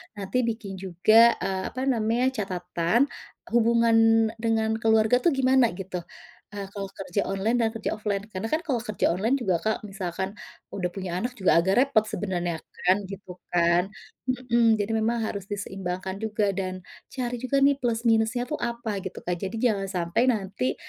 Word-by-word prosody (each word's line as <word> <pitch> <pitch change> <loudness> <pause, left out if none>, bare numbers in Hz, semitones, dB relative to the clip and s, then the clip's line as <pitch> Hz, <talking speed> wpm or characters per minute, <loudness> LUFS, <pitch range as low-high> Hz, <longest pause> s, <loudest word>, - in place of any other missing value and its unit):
nanti 200 +5 -3
bikin 200 -4 -5
juga, 215 +6 +5
eee, 190 -1 -1
apa 260 0 -4
namanya, 245 0 +1
catatan 185 +3 0 0.4
hubungan 225 -1 +4
dengan 220 -1 0
keluarga 220 +2 +4
tuh 300 +1 +2
gimana, 260 -2 +4
gitu, 185 -1 -5 0.5
eee, 200 -1 -5
kalau 200 -1 -5
kerja 195 +1 -1
online 215 +5 0
dan 225 -1 +2
kerja 225 - -3
offline. 205 -2 -2
Karena 190 +4 -3
kan 315 - +3
kalau 250 -5 +1
kerja 215 -5 0
online 220 +9 +1
juga, 190 -7 +1
Kak, 220 0 +1
kalau - - -7
misalkan 190 0 -3 0.5
udah 180 -2 -1
punya 185 -2 -4
anak, 245 +4 -2
juga 185 -3 +4
agak 190 +3 +2
repot 265 -5 +4
sebenarnya, 175 -6 -2 0.3
kan, 185 +2 +6
gitu 190 -1 -9 0.2
kan. 170 0 +4 0.5
Mhm, 240 -3 +3
jadi 205 +2 -1
memang 230 +2 0
harus 200 -2 -5
diseimbangkan 190 -2 -4
juga 210 -2 0
dan 185 -1 -3 0.3
cari 245 -1 -2
juga 275 +2 +1
nih, 280 - +4
plus 235 -2 -1
minusnya 225 +2 +2
tuh 300 - -2
apa, 235 -4 -3
gitu, 190 - -6
Kak. 180 0 0
Jadi 220 - -7
jangan 200 -4 +1
sampai 170 +7 +1
nanti 190 - -2
215 Hz, 170 wpm, -26 LUFS, 190-235 Hz, 0.5 s, kan